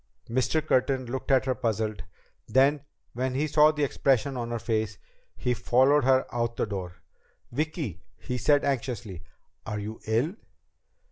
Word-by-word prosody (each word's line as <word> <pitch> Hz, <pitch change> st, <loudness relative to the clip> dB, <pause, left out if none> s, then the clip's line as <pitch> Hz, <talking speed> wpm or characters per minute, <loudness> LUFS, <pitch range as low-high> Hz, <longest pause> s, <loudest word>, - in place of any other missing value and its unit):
Mr. 130 Hz, +6 st, 0 dB
Curtin 130 Hz, -2 st, +1 dB
looked 130 Hz, +2 st, -5 dB
at 130 Hz, -1 st, +4 dB
her, 130 Hz, -, +1 dB
puzzled. 110 Hz, -3 st, -2 dB, 0.4 s
Then, 135 Hz, +5 st, +3 dB, 0.3 s
when 130 Hz, +2 st, -2 dB
he 145 Hz, +3 st, +1 dB
saw 150 Hz, 0 st, +5 dB
the 150 Hz, -1 st, -2 dB
expression 135 Hz, -1 st, +1 dB
on 120 Hz, -2 st, -3 dB
her 120 Hz, -, -2 dB
face, 110 Hz, -3 st, -1 dB, 0.4 s
he 125 Hz, -, 0 dB
followed 130 Hz, +4 st, +3 dB
her 130 Hz, 0 st, +4 dB
out 120 Hz, -1 st, -1 dB
the -, -, +1 dB
door. 95 Hz, -4 st, -6 dB, 0.5 s
"Vicki," 145 Hz, -, -3 dB, 0.2 s
he 125 Hz, -1 st, -4 dB
said 145 Hz, +4 st, +3 dB
anxiously, 120 Hz, -9 st, -3 dB, 0.4 s
"are 105 Hz, -, -4 dB
you 105 Hz, +2 st, -6 dB
ill?" 120 Hz, -, +1 dB
125 Hz, 150 wpm, -27 LUFS, 110-140 Hz, 0.5 s, saw